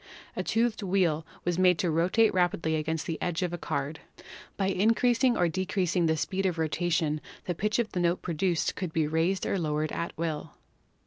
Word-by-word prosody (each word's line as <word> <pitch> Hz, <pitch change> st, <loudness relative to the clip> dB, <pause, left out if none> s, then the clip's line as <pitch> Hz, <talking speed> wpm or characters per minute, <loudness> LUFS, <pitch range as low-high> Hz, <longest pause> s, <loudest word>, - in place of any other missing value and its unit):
A -, -, -1 dB
toothed 225 Hz, 0 st, 0 dB
wheel 180 Hz, -5 st, +1 dB, 0.2 s
was 175 Hz, 0 st, 0 dB
made 180 Hz, -2 st, +5 dB
to 175 Hz, -1 st, 0 dB
rotate 180 Hz, +8 st, +3 dB
rapidly 175 Hz, -3 st, +1 dB
against 155 Hz, 0 st, -2 dB
the 160 Hz, -3 st, -4 dB
edge 175 Hz, 0 st, -1 dB
of 175 Hz, -1 st, -2 dB
a -, -, -2 dB
card. 145 Hz, 0 st, -3 dB, 0.6 s
By 195 Hz, -, 0 dB
increasing 230 Hz, +5 st, +3 dB
or 175 Hz, -, +3 dB
decreasing 180 Hz, -1 st, 0 dB
the 160 Hz, 0 st, +1 dB
speed 190 Hz, +5 st, -1 dB
of 175 Hz, -2 st, -2 dB
rotation 160 Hz, -1 st, 0 dB, 0.2 s
the 175 Hz, -, -1 dB
pitch 210 Hz, +5 st, 0 dB
of 235 Hz, -2 st, 0 dB
the 180 Hz, -, -2 dB
note 175 Hz, 0 st, +1 dB
produced 170 Hz, 0 st, 0 dB
could 180 Hz, -5 st, -4 dB
be 160 Hz, -2 st, +2 dB
raised 165 Hz, +5 st, 0 dB
or 195 Hz, -, 0 dB
lowered 155 Hz, -1 st, -1 dB
at 170 Hz, -, -4 dB
will. 160 Hz, -2 st, -3 dB
175 Hz, 190 wpm, -28 LUFS, 160-190 Hz, 0.6 s, made